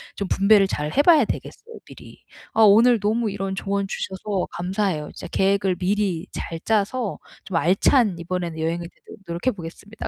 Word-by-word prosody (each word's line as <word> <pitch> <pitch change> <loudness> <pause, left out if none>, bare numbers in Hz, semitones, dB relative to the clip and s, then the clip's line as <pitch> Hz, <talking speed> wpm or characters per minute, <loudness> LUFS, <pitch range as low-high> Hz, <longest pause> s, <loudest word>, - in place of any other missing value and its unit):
좀 200 -2 -4
분배를 200 0 +4
잘 150 -5 -3
해 285 - +5
봐야 305 -4 +5
되겠어요 460 - -7
미리. - - -14 0.3
아 225 - +2
오늘 225 +3 +6
너무 220 +2 0
이런 195 -1 -4
조언 200 +1 -2
주셔서 190 0 -3
감사해요. 180 -3 -2
진짜 - - -8
계획을 195 -1 +1
미리 185 -1 -1
잘 165 - -5
짜서 220 +1 -1 0.3
좀 190 -4 -3
알찬 195 +4 +3
이번에는 170 -1 -4
여행이 170 +2 -2
되도록 - - -16
노력해 170 +9 -1
보겠습니다. 200 +4 -9
195 Hz, 365 characters per minute, -23 LUFS, 175-215 Hz, 0.3 s, 오늘